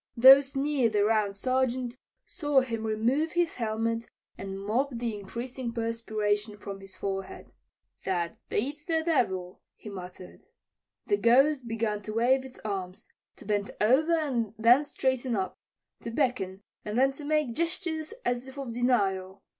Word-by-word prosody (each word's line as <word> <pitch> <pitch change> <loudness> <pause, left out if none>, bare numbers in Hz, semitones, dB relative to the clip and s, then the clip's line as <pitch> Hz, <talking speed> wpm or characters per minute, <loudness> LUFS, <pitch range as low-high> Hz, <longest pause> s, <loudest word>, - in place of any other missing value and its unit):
Those 270 +3 +8
near 275 -3 +2
the 205 -1 +2
Round 210 -2 +1
Sergeant 255 0 0 0.3
saw 290 -6 +2
him 230 -3 -3
remove 240 +9 +1
his 345 -1 +1
helmet 230 0 -2 0.3
and 195 0 -6
mop 225 +8 0
the 230 -2 -2
increasing 235 +5 -5
perspiration 215 -2 -1
from 200 -1 -7
his 195 -1 -11
forehead. 195 -1 -5 0.5
"That 175 -3 -2
beats 285 +7 -2
the 320 -1 0
devil," 190 - 0
he 215 - -10
muttered. 180 -2 -9 0.6
The 410 - +2
Ghost 265 +1 +4
began 225 -2 -1
to 215 +1 -6
wave 250 +4 +3
its 265 -1 -10
arms, 190 -3 -5 0.3
to - - -14
bend 205 -1 0
over 270 +10 +4
and 255 -9 0
then 240 +6 +6
straighten 260 -3 -1
up; 190 -2 -3 0.4
to - - -6
beckon 230 -7 -1 0.2
and 210 +2 -3
then 270 +2 +4
to 285 +2 -9
make 300 -4 +1
gestures 330 - -2
as 245 +1 -1
if 265 +1 -11
of 265 -4 -5
denial. 195 -6 0
235 Hz, 150 wpm, -28 LUFS, 205-270 Hz, 0.6 s, Those